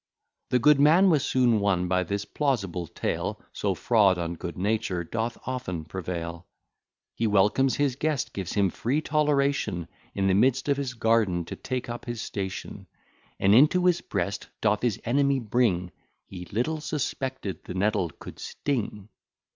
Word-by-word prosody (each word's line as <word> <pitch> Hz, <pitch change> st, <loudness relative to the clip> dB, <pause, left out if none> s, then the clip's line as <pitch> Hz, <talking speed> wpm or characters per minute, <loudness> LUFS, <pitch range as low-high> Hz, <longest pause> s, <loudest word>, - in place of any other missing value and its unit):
The 125 Hz, -, +3 dB
good 145 Hz, +3 st, +5 dB
man 170 Hz, +6 st, +6 dB
was 150 Hz, -4 st, +3 dB
soon 120 Hz, -4 st, +3 dB
won 95 Hz, -3 st, +1 dB
by 90 Hz, +1 st, +2 dB
this 100 Hz, +3 st, -3 dB
plausible 100 Hz, -, -1 dB
tale, -, -, -3 dB
So -, -, -1 dB
fraud 105 Hz, -6 st, +3 dB
on 85 Hz, 0 st, -2 dB
good 85 Hz, 0 st, -7 dB
nature 100 Hz, -2 st, -1 dB
doth 115 Hz, +6 st, -3 dB
often 120 Hz, -11 st, -4 dB
prevail. 85 Hz, -1 st, -5 dB, 0.7 s
He 115 Hz, -, 0 dB
welcomes 105 Hz, +6 st, +3 dB
his 140 Hz, -3 st, +1 dB
guest, 150 Hz, -2 st, -1 dB
gives 95 Hz, -2 st, -4 dB
him 100 Hz, -3 st, +2 dB
free 130 Hz, +6 st, -1 dB
toleration 140 Hz, -, +1 dB, 0.3 s
In 95 Hz, -, 0 dB
the 95 Hz, -, +3 dB
midst 130 Hz, +7 st, +3 dB
of 140 Hz, -1 st, +2 dB
his 135 Hz, -3 st, -3 dB
garden 110 Hz, -7 st, +2 dB
to -, -, -6 dB
take 130 Hz, -1 st, -4 dB
up 120 Hz, 0 st, -6 dB
his 120 Hz, -2 st, -4 dB
station, 95 Hz, -4 st, -5 dB, 0.5 s
And 100 Hz, +1 st, +4 dB
into 155 Hz, -, +5 dB
his 175 Hz, -1 st, +3 dB
breast 100 Hz, +1 st, -3 dB
doth 105 Hz, -1 st, +1 dB
his 120 Hz, -5 st, 0 dB
enemy 140 Hz, +3 st, +2 dB
bring, 105 Hz, -7 st, +1 dB, 0.3 s
He 90 Hz, -1 st, -9 dB
little 125 Hz, -, -2 dB
suspected 130 Hz, -, -3 dB
the 90 Hz, -, -6 dB
nettle 95 Hz, -2 st, +1 dB
could -, -, -12 dB
sting. 110 Hz, -7 st, -3 dB
110 Hz, 160 wpm, -26 LUFS, 95-135 Hz, 0.7 s, man